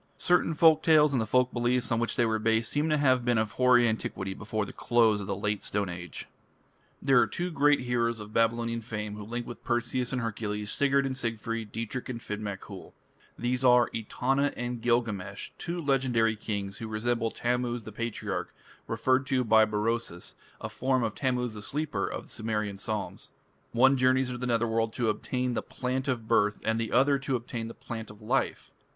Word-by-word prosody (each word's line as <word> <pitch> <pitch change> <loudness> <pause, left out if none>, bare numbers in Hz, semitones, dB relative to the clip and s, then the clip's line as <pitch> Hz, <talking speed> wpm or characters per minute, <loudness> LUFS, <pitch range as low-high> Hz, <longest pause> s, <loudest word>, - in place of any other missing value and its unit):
Certain 175 -2 +2
folk 160 0 +6
tales, 150 -3 +5
and 125 - +2
the 110 - -2
folk 125 +3 +2
beliefs 120 +1 0
on 115 - +2
which 115 - -1
they 120 - +3
were 110 -1 0
based, 110 0 +1
seem 150 +2 +1
to 155 - +3
have 130 -4 +3
been 120 -1 +2
of 110 -1 0
hoary 125 0 +4
antiquity 95 -3 -2
before 110 +1 -3
the - - -9
close 115 -3 +3
of 95 - -6
the 100 - -1
Late 105 +1 -2
Stone 100 -2 -2
Age. 90 -1 -7 0.8
There 135 -2 +5
are - - +4
two 175 +1 -3
great 145 -2 +3
heroes 120 -2 0
of 105 0 -9
Babylonian 115 0 +1
fame 105 -2 -5
who 105 - -7
link 120 +3 -4
with 120 - -9
Perseus 120 +1 -1
and 130 - -1
Hercules, 105 -2 -3
Sigurd 140 -1 +2
and 135 -1 -2
Siegfried, 115 -3 -3
Dietrich 115 +3 -4
and 120 -2 -4
Finn 105 -2 -5
mac 100 -2 -4
Coul. 100 -3 -11 0.4
These 125 +1 -1
are 125 -1 +5
Etana 135 +5 0
and 120 -1 -3
Gilgamesh, 115 -5 -1
two 175 +1 -3
legendary 125 -7 +2
kings 100 -2 -4
who 115 - -6
resemble 115 +1 -1
Tammuz 120 0 -1
the 110 - -8
Patriarch 115 +1 -4 0.4
referred 130 +1 +1
to 130 -1 +2
by 110 -1 +5
Berosus, 110 -3 -2 0.3
a - - -5
form 130 -1 0
of 110 -2 -1
Tammuz 125 -3 -1
the 105 - -7
Sleeper 135 -5 -2
of - - -5
the - - -18
Sumerian 105 -3 -2
psalms. 105 0 -4 0.4
One 130 +3 +5
journeys 130 0 +3
to 125 -1 -5
the 125 - -2
Nether 115 -1 +1
World 115 0 0
to 120 -2 0
obtain 125 +3 -1
the - - -1
Plant 130 +1 -3
of 120 -4 -2
Birth 105 -2 +2
and 110 0 +1
the 115 -1 -2
other 135 +3 +4
to 135 -1 -1
obtain 115 -1 -4
the 115 - -9
Plant 115 -2 -7
of 105 0 -13
Life. 110 - -1
115 Hz, 200 wpm, -28 LUFS, 110-125 Hz, 0.8 s, folk